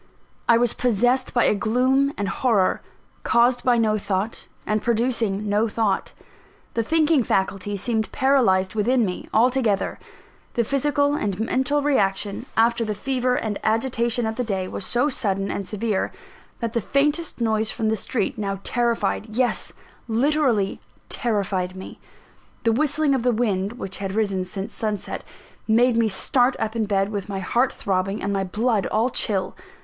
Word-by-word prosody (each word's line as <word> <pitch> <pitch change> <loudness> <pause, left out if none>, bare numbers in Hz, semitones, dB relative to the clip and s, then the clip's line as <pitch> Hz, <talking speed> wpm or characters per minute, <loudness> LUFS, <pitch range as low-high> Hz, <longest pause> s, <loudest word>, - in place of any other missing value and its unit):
I 235 - +7
was 240 -1 +2
possessed 245 +2 +1
by 240 - +2
a - - +4
gloom 255 +6 +2
and 200 - -1
horror, 210 -5 +1 0.4
caused 240 +1 +3
by 245 -2 +3
no 215 -2 +2
thought, 200 +2 -3 0.2
and 215 0 0
producing 225 -3 0
no 210 +2 +2
thought: 215 -3 -1 0.6
the 230 - +1
thinking 310 +3 +3
faculty 195 -1 -1
seemed 220 +2 -1
paralysed 235 -9 +2
within 230 +3 +2
me, 180 -2 -5
altogether. 235 -3 +1 0.6
The 235 - +2
physical 285 +3 +1
and 205 -9 -2
mental 265 +5 +1
reaction, 205 -4 0
after 230 +1 +3
the 215 -1 -2
fever 250 +2 0
and 215 -4 -2
agitation 235 +1 +1
of 220 0 -3
the 250 - 0
day, 190 -5 -2
was 185 - -5
so 245 +4 +2
sudden 195 -8 -1
and 195 - -4
severe, 210 -2 -1 0.5
that 230 -1 -2
the 235 - 0
faintest 295 - 0
noise 220 -2 +1
from 220 -1 -1
the 220 - +2
street 215 +1 -2
now 195 -2 -2
terrified 235 -3 0
yes, 245 +3 +1 0.4
literally 240 -4 +1 0.3
terrified 195 -6 -1
me. 190 - -9 0.6
The 230 - +3
whistling 295 +3 +2
of 265 - +1
the 245 +1 +2
wind 210 -3 0
which 195 -6 -6
had 195 0 -4
risen 200 -4 0
since 190 +2 -6
sunset 215 -2 -3 0.4
made 235 +2 +4
me 230 -1 +3
start 250 +5 +2
up 220 +1 -3
in 225 -2 0
bed, 195 -1 +1
with 205 -2 -4
my 195 - -3
heart 235 +7 +1
throbbing, 195 +1 -2
and 200 +1 -1
my 195 -1 0
blood 210 +2 0
all 230 +4 +1
chill. 195 -6 -1
225 Hz, 160 wpm, -23 LUFS, 200-250 Hz, 0.6 s, I